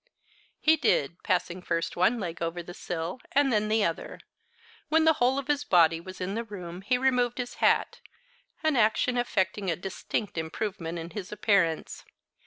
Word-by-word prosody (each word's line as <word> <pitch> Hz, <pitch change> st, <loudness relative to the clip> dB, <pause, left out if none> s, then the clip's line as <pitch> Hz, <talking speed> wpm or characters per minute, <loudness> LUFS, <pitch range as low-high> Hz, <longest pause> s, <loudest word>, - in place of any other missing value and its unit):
He 315 Hz, +1 st, +4 dB
did, 170 Hz, -, +1 dB
passing 180 Hz, 0 st, -1 dB
first 165 Hz, -1 st, -2 dB
one 185 Hz, +7 st, +3 dB
leg 170 Hz, -5 st, -5 dB
over 170 Hz, +1 st, -2 dB
the 175 Hz, -, -9 dB
sill, 175 Hz, +5 st, -4 dB
and 275 Hz, -2 st, +3 dB
then 210 Hz, 0 st, +2 dB
the 215 Hz, 0 st, +2 dB
other. 165 Hz, -3 st, -3 dB, 0.7 s
When 320 Hz, +1 st, +4 dB
the 320 Hz, -, +6 dB
whole 255 Hz, +2 st, +4 dB
of 275 Hz, -1 st, -3 dB
his 290 Hz, -1 st, +1 dB
body 165 Hz, -2 st, +4 dB
was 185 Hz, +2 st, -10 dB
in 185 Hz, +2 st, -3 dB
the 230 Hz, +2 st, -2 dB
room 180 Hz, -5 st, -8 dB
he 230 Hz, +6 st, +1 dB
removed 250 Hz, -2 st, +1 dB
his 245 Hz, -1 st, -4 dB
hat, -, -, +2 dB, 0.6 s
the 315 Hz, -, +4 dB
action 220 Hz, +3 st, +2 dB
effecting 205 Hz, -4 st, 0 dB
a 165 Hz, -, +1 dB
distinct 190 Hz, +1 st, -4 dB
improvement 170 Hz, +1 st, -4 dB
in 165 Hz, +1 st, -6 dB
his 205 Hz, -3 st, -6 dB
appearance. 200 Hz, -6 st, +1 dB
195 Hz, 175 wpm, -28 LUFS, 170-245 Hz, 0.7 s, the